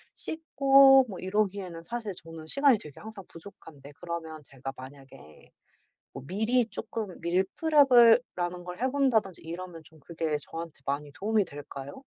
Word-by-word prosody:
씻고 275 -4 +5
뭐 195 -5 -8
이러기에는 190 -3 -2
사실 230 +1 -5
저는 165 -1 -10
시간이 275 - +3
되게 150 -2 -12
항상 215 -3 -10
부족한데 155 -5 -14
그러면 165 -3 -6
제가 135 0 -8
만약에 130 - -14 0.6
뭐 - - -8
미리 220 - +1
쪼끔 220 -3 -6
밀프렙을 240 - +5 0.2
라는 175 0 -3
걸 180 +5 -8
해 260 - +2
본다든지 240 - +1
이러면 170 0 -8
좀 160 -1 -19
그게 160 0 -3
저한테 165 0 -8
많이 145 +1 -3
도움이 210 +2 0
될까요? 140 - -9
180 Hz, 320 characters per minute, -28 LUFS, 160-230 Hz, 0.6 s, 씻고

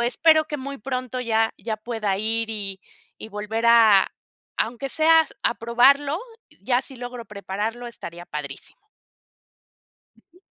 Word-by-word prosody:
espero 310 +6 +4
que 300 - -4
muy 275 0 -6
pronto 255 +1 -4
ya 225 -2 +1
ya 220 -2 -3
pueda 215 -3 -2
ir 225 +2 -1
y 200 -3 -5 0.4
y 220 - -9
volver 215 +2 -3
a, 225 -4 +6 0.5
aunque 240 +4 -2
sea 320 +2 +5 0.2
a 235 - +2
probarlo, 275 +6 +3 0.4
ya 245 -1 +2
si 265 0 -7
logro 245 -1 -7
prepararlo 210 +4 -4
estaría 175 -7 -8
padrísimo. 140 -2 -7 1.5
Ujú. 360 - -22
235 Hz, 130 wpm, -23 LUFS, 215-255 Hz, 1.5 s, a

